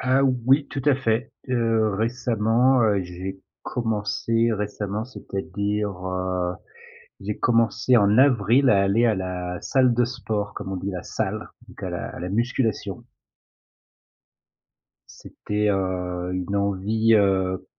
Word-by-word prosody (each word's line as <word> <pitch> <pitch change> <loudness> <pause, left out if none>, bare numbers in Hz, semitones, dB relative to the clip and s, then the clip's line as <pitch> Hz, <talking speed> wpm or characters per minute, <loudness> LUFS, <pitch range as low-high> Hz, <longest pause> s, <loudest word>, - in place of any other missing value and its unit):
Ah 130 +2 +2
oui, 130 +2 +2
tout 135 -2 -5
à 145 -2 +5
fait, 120 0 -1 0.2
heu, 115 -4 +1
récemment, 120 +2 +2
heu, 100 -3 +2
j'ai 95 +2 -7 0.2
commencé 115 0 0
récemment, 105 0 -3
c'est-à-dire, 100 -3 -3 0.2
heu, 90 -1 -2 0.7
j'ai - - -4
commencé 115 +1 +3
en 105 +2 +4
avril 130 0 +4
à 100 -1 +4
aller 105 +5 +3
à 110 - +3
la 90 -2 -4
salle 130 -3 +3
de 120 0 +3
sport, 110 -4 -3
comme 95 -1 -5
on - - -2
dit 95 +2 -3
la 90 -1 -5
salle, 110 0 -3 0.2
donc - - -14
à - - -2
la - - -4
à - - -8
la 90 - -4
musculation. 115 +1 -1 2.1
C'était, 105 0 -3
heu, 90 -2 -2
une 90 +2 -3
envie, 100 +3 +1
heu 95 -2 +1
105 Hz, 135 wpm, -24 LUFS, 95-120 Hz, 2.1 s, à